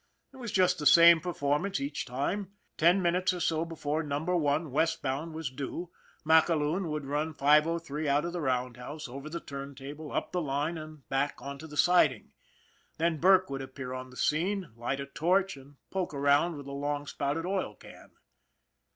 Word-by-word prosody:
It - - -13
was 235 -5 -5
just 180 -2 +3
the 150 - +2
same 170 +2 +8
performance 170 +3 -1
each 140 +1 -4
time. 185 - -2 0.2
Ten 175 +4 +4
minutes 180 +2 +2
or - - -5
so 165 -1 0
before 160 -2 -2
Number 155 +4 -1
One, 150 -1 +1
westbound, 155 0 -1
was 160 -5 -4
due, 145 +6 -5 0.3
MacAloon 160 +2 +3
would 150 -2 -3
run 150 +3 -2
503 150 +1 +2
out 145 +3 +2
of 170 - -4
the 175 - -3
roundhouse, 125 +2 -3
over 135 +4 -8
the 170 +2 -4
turntable, 140 +2 -8
up - - -2
the 180 - -1
line, 145 +2 -1
and 155 -3 -10
back 135 +1 0
onto 140 +3 -7
the 150 -1 -10
siding. 155 - +3 0.7
Then 165 -1 +1
Burke 185 -2 +5
would 135 0 -3
appear 130 -1 -7
on 130 0 -6
the 125 - -14
scene, 180 - 0
light 120 +4 -3
a 140 - -3
torch, 185 +6 +1
and 140 +1 -15 0.2
poke 185 -5 -2
around 145 +4 +3
with 140 - -9
a 140 - -7
long 145 +1 -2
spouted 145 +3 -2
oil 190 +1 -2
can. - - -14
150 Hz, 175 wpm, -30 LUFS, 140-170 Hz, 0.7 s, same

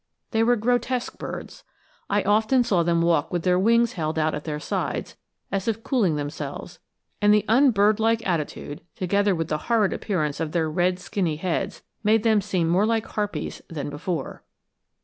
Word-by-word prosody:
They 220 - +2
were 240 +2 +4
grotesque 245 +2 -1
birds. - - -7 0.5
I 205 0 +2
often 220 +5 +3
saw 195 -7 +2
them 170 0 +2
walk 165 -3 +2
with 175 -2 -1
their 180 0 +3
wings 230 +3 +3
held 160 -2 -2
out 155 0 +1
at 150 - -5
their 150 -2 -3
sides - - -3 0.4
as 195 +1 -2
if 225 0 -1
cooling 210 - +1
themselves, 145 0 -6 0.4
and 205 0 +5
the 210 0 +4
unbird 215 -4 +4
like 225 0 +1
attitude 150 -4 -3
together 200 +1 +1
with 165 -1 -3
the 155 - -1
horrid 220 -4 +3
appearance 155 -9 -2
of 160 -2 -3
their 160 -3 0
red 180 +3 +1
skinny 185 -3 -2
heads 185 +3 -3 0.2
made 215 +1 +3
them 220 -3 +4
seem 180 -3 0
more 185 +6 +3
like 225 -1 +1
harpies 210 -1 -4
than 145 -3 -5
before. 155 0 -4
190 Hz, 175 wpm, -24 LUFS, 165-220 Hz, 0.5 s, and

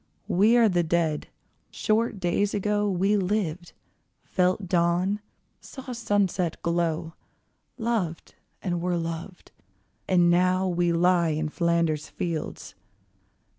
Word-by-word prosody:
We 215 +6 +4
are 230 -2 +6
the 180 -4 +2
Dead. 165 -2 0 0.4
Short 215 -1 0
days 190 +3 0
ago 210 +1 0
We 195 +3 +2
lived, 185 -3 -2 0.5
felt 185 +1 0
dawn, 175 +3 +1 0.4
saw 265 -2 -9
sunset 200 -7 0
glow, 170 -1 -1 0.6
Loved, 220 -9 -2 0.3
and 175 -3 -1
were 175 0 0
loved, 165 +2 -6 0.6
and 175 -2 +4
now 185 +2 +2
we 175 -1 +1
lie 170 0 +3
In 155 0 -1
Flanders 170 -2 0
fields. 165 -3 -4
180 Hz, 110 wpm, -26 LUFS, 170-200 Hz, 0.6 s, are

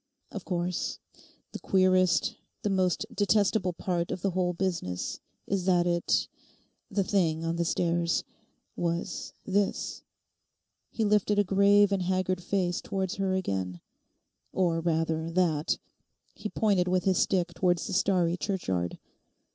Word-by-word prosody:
Of 200 - -7
course, 180 -1 -2 0.5
the - - -6
queerest, 185 -3 +3 0.3
the 205 - 0
most 185 0 +1
detestable 205 -3 +2
part 170 0 -2
of 180 - -4
the 195 - +1
whole 180 0 0
business 170 - -2 0.3
is 190 -2 -1
that 175 -2 +3
it—the 175 +3 -2
thing 165 -5 +1
on 165 +1 -1
the 170 - +1
stairs—was 170 0 -2
this'—he 205 +2 -4
lifted 210 0 +2
a 205 - +5
grave 200 +1 +4
and 195 -1 +1
haggard 185 0 0
face 180 -1 -1
towards 190 -1 -3
her 190 -1 0
again—'or 165 - -4
rather 165 -1 0
that,' 165 -3 +1 0.6
he 210 - -6
pointed 200 -5 +2
with 180 -1 +1
his 190 -1 +2
stick 180 -3 +1
towards 175 0 +1
the - - -4
starry 180 -3 +2
churchyard. 95 - -2
180 Hz, 125 wpm, -28 LUFS, 170-195 Hz, 0.6 s, a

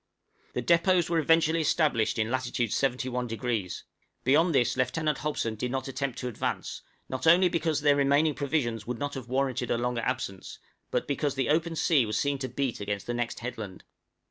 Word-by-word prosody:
} - - -36
The 125 - -1
depôts 170 +2 +3
were 165 - +3
eventually 165 +1 +3
established 145 -9 +2
in 110 +1 0
latitude 125 -3 -1
71°; 125 -5 -1 0.4
beyond 155 +5 +3
this 120 -2 +3
Lieutenant 135 +4 0
Hobson 145 -7 -2
did 115 +3 -3
not 130 +1 -3
attempt 135 -1 -3
to 125 - -3
advance, 120 - -3 0.3
not 130 +3 -3
only 180 +2 +6
because 160 -3 0
their 145 -1 +4
remaining 140 +2 +3
provisions 130 -7 -1
would 125 -1 -3
not 145 +3 -3
have 130 -3 -7
warranted 130 -2 0
a - - +1
longer 120 0 -1
absence, 110 -6 -4 0.3
but - - -1
because 145 0 -1
the 135 -1 0
open 165 +2 +1
sea 145 -7 +3
was 105 0 -1
seen 140 -1 0
to 130 -1 -3
beat 135 -4 -2
against 100 0 -3
the 120 - -2
next 120 -1 -3
headland. 110 -6 -6
130 Hz, 185 wpm, -28 LUFS, 120-150 Hz, 0.4 s, only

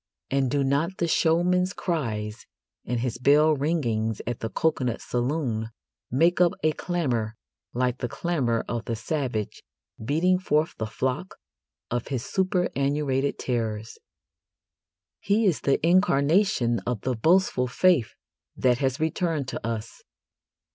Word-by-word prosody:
And 135 -1 +2
do 140 +2 +1
not 145 +8 0
the 170 - 0
showman's 180 +4 +2
cries 115 - -3 0.4
and 120 0 -1
his 125 -3 -2
bell 150 +4 +5
ringings 120 -8 -1
at 120 0 -3
the 115 - -3
coconut 130 -7 0
saloon 120 -3 -2 0.4
make 165 +8 +3
up 175 -1 +5
a 155 - +4
clamour 130 - -2 0.4
like 125 0 0
the 125 - -2
clamour 130 -8 -1
of 120 -1 -3
the 115 - -2
savage 120 -3 -3 0.4
beating 170 +9 +2
forth 155 -3 +1
the 110 - -2
flock 130 - -3 0.6
of 120 0 -2
his 130 -4 -3
superannuated 145 -7 0
terrors? 110 -3 -3 1.2
He 210 +3 +1
is 180 -6 +2
the 140 - +2
incarnation 165 - +3
of 120 -4 -1
the 130 - -1
boastful 160 0 +2
faith 155 -1 +2 0.4
that 125 -1 +2
has 135 -1 0
returned 160 -2 -1
to - - -5
us. 115 -1 -5
135 Hz, 130 wpm, -26 LUFS, 120-165 Hz, 1.2 s, bell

